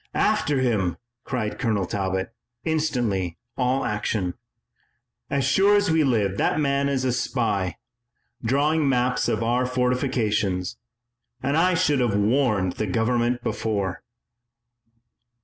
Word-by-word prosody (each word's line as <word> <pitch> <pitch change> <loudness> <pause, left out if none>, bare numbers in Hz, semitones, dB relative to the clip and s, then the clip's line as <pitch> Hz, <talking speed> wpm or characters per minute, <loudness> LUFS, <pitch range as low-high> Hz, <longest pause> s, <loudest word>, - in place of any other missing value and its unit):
"After 180 -10 +2
him!" 105 -9 0 0.3
cried 115 -5 -3
Colonel 110 -6 0
Talbot, 95 +2 -2 0.3
instantly 120 - 0 0.2
all 130 +1 0
action. 105 -3 -1 1.0
"As 140 -1 0
sure 195 +9 +4
as 205 -3 +2
we 160 -1 +3
live 105 -8 +1
that - - +1
man 140 -1 +1
is 130 -2 0
a 130 - +2
spy, 110 - -1 0.7
drawing 145 +5 +2
maps 125 -1 +1
of 110 +1 0
our 125 +2 +1
fortifications, 120 -6 0 0.7
and 140 +2 +1
I 180 +3 +3
should 150 -5 +2
have 120 -5 +1
warned 105 -3 +1
the 110 - -1
Government 120 +4 0
before." 100 -4 -2
125 Hz, 120 wpm, -24 LUFS, 105-140 Hz, 1.0 s, sure